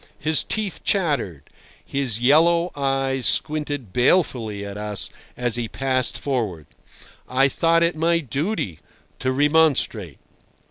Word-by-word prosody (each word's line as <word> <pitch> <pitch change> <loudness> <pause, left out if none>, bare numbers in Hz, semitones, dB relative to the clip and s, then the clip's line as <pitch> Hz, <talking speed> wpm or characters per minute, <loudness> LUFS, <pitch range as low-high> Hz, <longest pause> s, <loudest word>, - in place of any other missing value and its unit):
His 155 0 +2
teeth 215 -4 -3
chattered; 145 - 0 0.4
his 130 -5 -2
yellow 170 +7 +4
eyes 135 -2 0
squinted 145 -8 -1
balefully 120 - +1
at 100 0 -7
us 105 -1 -4 0.3
as 120 -2 0
he 120 -1 -2
passed 130 0 0
forward. 110 - -2 0.6
I 135 +2 +4
thought 165 +4 +2
it 170 0 +1
my 165 +2 +2
duty 140 - -3 0.4
to 130 - 0
remonstrate. 140 - +2
135 Hz, 120 wpm, -22 LUFS, 115-160 Hz, 0.6 s, yellow